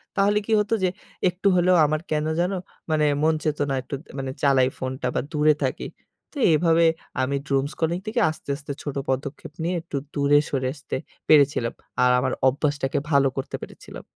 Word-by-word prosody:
তাহলে 205 +1 +3
কি 225 - 0
হতো 210 +2 0
যে 185 - +4 0.4
একটু 180 +3 -2
হলেও 180 +1 +4
আমার 155 +1 0
কেনো 155 0 0
যেন 180 +2 +1 0.4
মানে 155 -1 +3 0.2
মন 160 +1 +4
চেত 155 -2 0
না - - 0
একটু 135 - -6 0.2
মানে 135 -1 -3
চালাই 135 -2 +4
ফোনটা 130 0 -3
বা - - +2
দূরে 150 0 +4
থাকি। 130 - -2 0.5
তো - - -10 0.2
এভাবে 165 +1 +4 0.4
আমি 135 +2 0
doom 135 0 +1
scrolling 170 +2 -1
থেকে 225 +3 0
আস্তে, 155 - -8
আস্তে 145 0 -7
ছোট 145 -2 -4
পদক্ষেপ 140 +3 -3
নিয়ে 175 +2 0
একটু 160 -3 -5 0.2
দূরে 145 0 +4
সরে 130 -2 -1
আসতে 140 -2 -6 0.3
পেরেছিলাম। 140 -6 +4 0.3
আর 125 - +5
আমার 130 0 0
অভ্যাসটাকে 140 +1 0
ভালো 140 -1 +5
করতে 135 - -3
পেরেছিলাম। - - -10
150 Hz, 180 wpm, -24 LUFS, 135-165 Hz, 0.5 s, আর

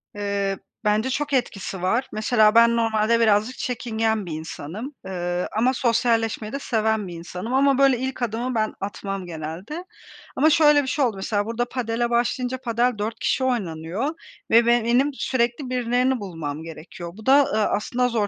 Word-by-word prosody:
Eee, 200 -1 -1 0.3
bence 215 +4 +1
çok 290 +2 -2
etkisi 195 -7 -2
var. 230 +8 +1
Mesela 215 0 +3
ben 235 0 +6
normalde 225 0 +2
birazcık 220 +2 +2
çekingen 225 -3 -1
bir 170 - -7
insanım, 165 - -6
ııı, 175 -1 -2
ama 250 +4 +3
sosyalleşmeyi 230 -3 0
de 275 - -2
seven 220 -5 0
bir 175 - -7
insanım 180 +7 -6
ama, 275 0 +4
böyle, 270 -2 +4
ilk 260 0 -4
adımı 240 +2 -2
ben 215 -1 0
atmam 195 -1 -4
genelde. 175 - -6 0.5
Ama 305 +4 +4
şöyle 295 -1 +5
bir - - -6
şey 280 +1 +1
oldu. 230 -4 -1
Mesela 205 +1 -1
burada 230 +2 -1
padele 240 -1 -1
başlayınca 245 +2 0
padel 245 0 0
4 220 +2 -3
kişi 260 - 0
oynanıyor 200 - -2 0.4
ve 230 +1 +6
be 235 0 +3
benim 250 +5 +3
sürekli 250 0 -1
birilerini 250 +1 +1
bulmam 160 -6 -5
gerekiyor. 165 +1 -9
Bu 220 - -12
da, 275 +2 +6
ııı, 215 -3 +1
aslında 245 +4 0
zor 225 -4 0
230 Hz, 165 wpm, -23 LUFS, 205-250 Hz, 0.5 s, ben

